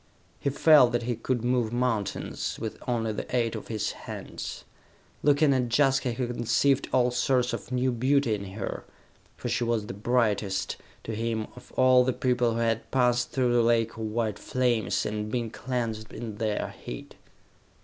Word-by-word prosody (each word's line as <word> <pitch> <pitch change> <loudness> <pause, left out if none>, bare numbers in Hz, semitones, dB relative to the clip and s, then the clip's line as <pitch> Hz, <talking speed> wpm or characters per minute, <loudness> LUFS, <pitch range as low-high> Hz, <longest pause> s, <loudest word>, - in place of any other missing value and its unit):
He - - 0
felt 140 -3 +6
that 120 0 0
he 120 0 -1
could 120 +1 -2
move 120 -2 +1
mountains, 120 -4 -2
with 110 - -4
only 115 -3 0
the 115 - -4
aid 115 -2 +1
of - - -7
his 110 -2 -2
hands. - - -7 0.6
Looking 145 0 +4
at 125 -2 0
Jaska 135 -3 +3
he 125 +2 -2
conceived 120 +3 +1
all 125 -1 +3
sorts 125 0 +1
of 115 +1 -6
new 125 +1 +1
beauty 130 0 +2
in 100 -1 -3
her, 100 -1 -4 0.5
for - - -5
she 120 - 0
was 115 -3 0
the - - -6
brightest, 105 -3 0 0.3
to 115 - -5
him, 110 0 -1
of 125 - -14
all 130 -1 +5
the 130 0 +1
people 125 -2 +1
who - - -2
had 115 -1 0
passed 125 -2 +2
through 125 -2 +1
the 120 - +4
lake 115 -1 +2
of - - -12
white 110 -1 -2
flames, 120 -6 0
and 105 0 -3
been 115 -2 -2
cleansed 115 -4 -3
in 110 -2 -6
their 110 -1 -2
heat. - - -7
120 Hz, 175 wpm, -27 LUFS, 110-125 Hz, 0.6 s, felt